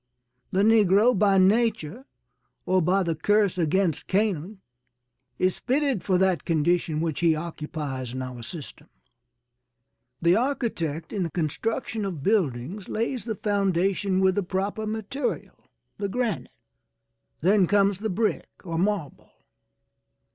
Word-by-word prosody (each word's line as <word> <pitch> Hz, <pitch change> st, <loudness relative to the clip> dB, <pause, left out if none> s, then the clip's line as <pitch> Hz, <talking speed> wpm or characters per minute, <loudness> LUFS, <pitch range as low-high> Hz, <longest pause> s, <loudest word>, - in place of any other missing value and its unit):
The 195 Hz, +2 st, +1 dB
negro, 215 Hz, +1 st, +5 dB
by 200 Hz, 0 st, +3 dB
nature 215 Hz, -, +2 dB, 0.6 s
or 185 Hz, 0 st, +2 dB
by 185 Hz, +4 st, +2 dB
the 170 Hz, -2 st, 0 dB
curse 200 Hz, +3 st, +1 dB
against 170 Hz, 0 st, +1 dB
Canaan 195 Hz, -1 st, -1 dB, 0.8 s
is 185 Hz, 0 st, 0 dB
fitted 270 Hz, -5 st, 0 dB
for 185 Hz, -2 st, +2 dB
that 185 Hz, -2 st, +2 dB
condition 165 Hz, -1 st, +1 dB
which 160 Hz, -3 st, -2 dB
he 165 Hz, -2 st, +3 dB
occupies 150 Hz, -5 st, -5 dB
in 130 Hz, 0 st, -4 dB
our 125 Hz, -2 st, -7 dB
system. 145 Hz, +4 st, -9 dB, 1.3 s
The 170 Hz, +1 st, +4 dB
architect 215 Hz, -, -2 dB
in 200 Hz, -, -1 dB
the 170 Hz, -, -1 dB
construction 210 Hz, +7 st, -2 dB
of 175 Hz, -8 st, -4 dB
buildings 180 Hz, -, -1 dB
lays 230 Hz, +2 st, -2 dB
the 220 Hz, -2 st, -3 dB
foundation 195 Hz, -1 st, 0 dB
with 190 Hz, 0 st, +4 dB
the 205 Hz, -, 0 dB
proper 200 Hz, +4 st, -3 dB
material, 220 Hz, +6 st, -4 dB, 0.3 s
the 200 Hz, -1 st, -2 dB
granite; 240 Hz, 0 st, -2 dB, 0.9 s
then 190 Hz, +2 st, +4 dB
comes 200 Hz, -1 st, +2 dB
the 220 Hz, +1 st, -2 dB
brick 215 Hz, +4 st, -1 dB
or 165 Hz, -3 st, -3 dB
marble. 190 Hz, -6 st, -2 dB
190 Hz, 125 wpm, -25 LUFS, 165-210 Hz, 1.3 s, negro